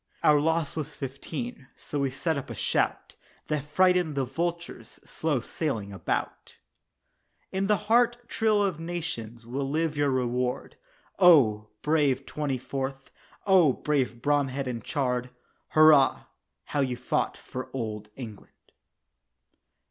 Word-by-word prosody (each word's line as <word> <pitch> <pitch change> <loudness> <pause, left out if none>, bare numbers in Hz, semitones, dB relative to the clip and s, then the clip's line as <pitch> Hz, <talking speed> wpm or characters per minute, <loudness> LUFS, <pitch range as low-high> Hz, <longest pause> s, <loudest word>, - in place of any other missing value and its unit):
Our 150 -1 +6
loss 160 -1 0
was 150 -2 -4
Fifteen 140 - -6
so 145 - -5
we 140 -1 +1
set 160 +5 -1
up 140 - -5
a - - -5
shout - - -1 0.4
That 150 -3 0
frightened 180 +1 +2
the 135 -1 0
vultures 170 +6 -4
slow 150 -6 -1
sailing 115 -8 -3
about. 95 - -3 0.9
In 195 +1 0
the 210 0 +3
heart 240 +2 +4
thrill 215 -3 +2
of 185 -6 -1
nations 155 -10 -5
will 135 +3 -3
live 155 +1 0
your 145 -1 +2
reward, 125 -1 -1 0.4
Oh! 125 - +6 0.2
brave 145 -4 +2
"Twenty 145 -3 -2
fourth," 135 +1 -5 0.3
oh! 185 -8 +5
brave 130 -6 -1
Bromhead 140 -2 +1
and 120 -3 -4
Chard 125 -3 -1 0.4
"Hurrah, 155 -3 +5 0.4
how 145 - -3
you 130 -3 0
fought 125 - -1
for 130 0 -7
Old 110 -4 -4
England." 110 -6 -11
140 Hz, 130 wpm, -27 LUFS, 125-165 Hz, 0.9 s, Our